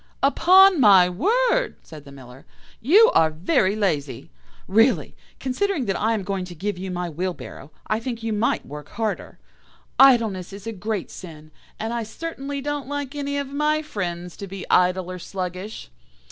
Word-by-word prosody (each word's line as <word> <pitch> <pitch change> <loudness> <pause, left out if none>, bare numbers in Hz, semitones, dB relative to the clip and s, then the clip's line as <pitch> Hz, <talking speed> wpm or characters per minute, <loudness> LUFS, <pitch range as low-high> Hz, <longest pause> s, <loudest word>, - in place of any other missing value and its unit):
"'Upon 370 +5 +6
my 195 -5 +7
word,' 475 - +1
said 155 -3 -12
the 140 - -12
Miller, 130 -1 -13 0.4
'you 395 - +6
are 160 - +4
very 185 - +1
lazy. 150 - -2 0.4
Really, 225 +7 +2 0.2
considering 285 +3 -1
that 195 - -1
I 225 +2 +1
am 205 - -3
going 195 -1 -3
to 180 -1 -10
give 195 +3 -4
you 190 +1 -5
my 180 -1 -3
wheelbarrow, 170 -3 -6 0.2
I 215 - -1
think 230 -1 -5
you 225 -1 -1
might 215 +3 0
work 150 +1 -9
harder. 220 -1 -4 0.6
Idleness 225 -9 +4
is 200 0 -10
a 225 - -3
great 210 -1 -4
sin, 155 -4 -11 0.3
and 225 +2 -3
I 235 - -2
certainly 280 +3 -6
don't 290 -1 -4
like 285 -1 -4
any 285 -1 -3
of 280 -1 -3
my 300 +2 0
friends 175 - -5
to 200 - -7
be 190 -1 -8
idle 180 0 +2
or 185 - -7
sluggish. 185 - -6
210 Hz, 170 wpm, -23 LUFS, 180-275 Hz, 0.6 s, my